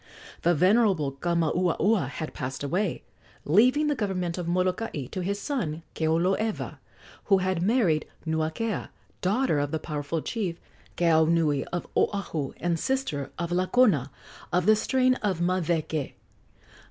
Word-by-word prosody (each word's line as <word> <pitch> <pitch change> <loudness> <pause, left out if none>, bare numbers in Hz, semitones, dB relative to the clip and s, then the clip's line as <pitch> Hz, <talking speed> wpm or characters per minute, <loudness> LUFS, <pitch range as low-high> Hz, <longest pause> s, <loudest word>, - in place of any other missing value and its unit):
The 175 +1 +3
venerable 185 -4 +3
Kamauaua 170 - +1
had 155 +2 -6
passed 130 +1 -5
away, 180 +6 -1 0.4
leaving 250 - +4
the 300 - +2
government 185 -8 -2
of 175 - -4
Molokai 180 - -1
to 185 - -3
his 200 +3 -2
son, 170 - -3
Keoloewa, 180 +7 0 0.5
who 195 - +5
had 185 -2 0
married 190 -7 +2 0.2
Nuakea, 160 +7 -2 0.3
daughter 200 - +1
of 145 0 -1
the 160 - -1
powerful 150 0 -3
chief, 190 -7 -3 0.4
Keaunui, 160 -3 +3
of 175 - -3
Oahu, 165 -9 -1
and 170 -1 -1
sister 260 - -1
of 170 0 -3
Lakona, 185 - +3 0.4
of 180 0 +1
the 215 +1 +6
strain 255 +4 +2
of 195 -5 0
Maweke. 170 -4 -1
175 Hz, 130 wpm, -27 LUFS, 160-205 Hz, 0.5 s, the